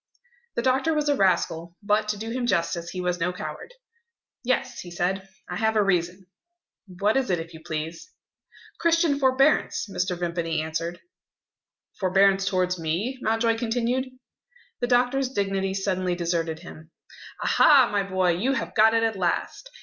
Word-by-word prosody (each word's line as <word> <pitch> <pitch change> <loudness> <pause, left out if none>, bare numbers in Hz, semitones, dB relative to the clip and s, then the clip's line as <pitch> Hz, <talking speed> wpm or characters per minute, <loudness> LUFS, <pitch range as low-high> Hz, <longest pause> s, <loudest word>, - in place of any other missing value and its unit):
The 235 - -1
doctor 265 +5 +2
was 300 -1 0
a 290 - +3
rascal; 170 -4 0
but, 210 +1 +1
to 210 -1 -1
do 225 +2 -5
him 245 0 -2
justice, 170 -4 0
he 185 - -6
was 180 0 -1
no 180 +1 0
coward. 180 - -7 0.7
"Yes," 255 +1 -1
he 175 - -8
said, 190 +3 -2 0.2
"I - - -4
have 220 0 +1
a 210 - +4
reason." 180 0 0 0.6
"What 200 +4 0
is 265 -1 0
it, 175 -2 +1
if 165 +1 -8
you 160 - -10
please?" 160 - -5 0.7
"Christian 335 -4 +2
forbearance," 270 -1 +2
Mr. 180 -2 -2
Vimpany 170 -2 -2
answered. 160 +2 -3 1.0
"Forbearance 195 +1 +3
towards 185 -2 0
me?" 185 +12 -2
Mountjoy 225 +1 +1
continued. 245 +3 -1 0.7
The 245 - -1
doctor's 250 +2 +2
dignity 195 -4 -1
suddenly 185 -2 -1
deserted 165 -2 -2
him. 160 -2 -12 0.5
"Aha, 280 -5 +6
my 205 -1 +1
boy, 185 -2 +1
you 215 +11 0
have - - -3
got 220 +1 +5
it 225 - +2
at 225 -1 +1
last!" 185 - -2
195 Hz, 155 wpm, -25 LUFS, 175-245 Hz, 1.0 s, Aha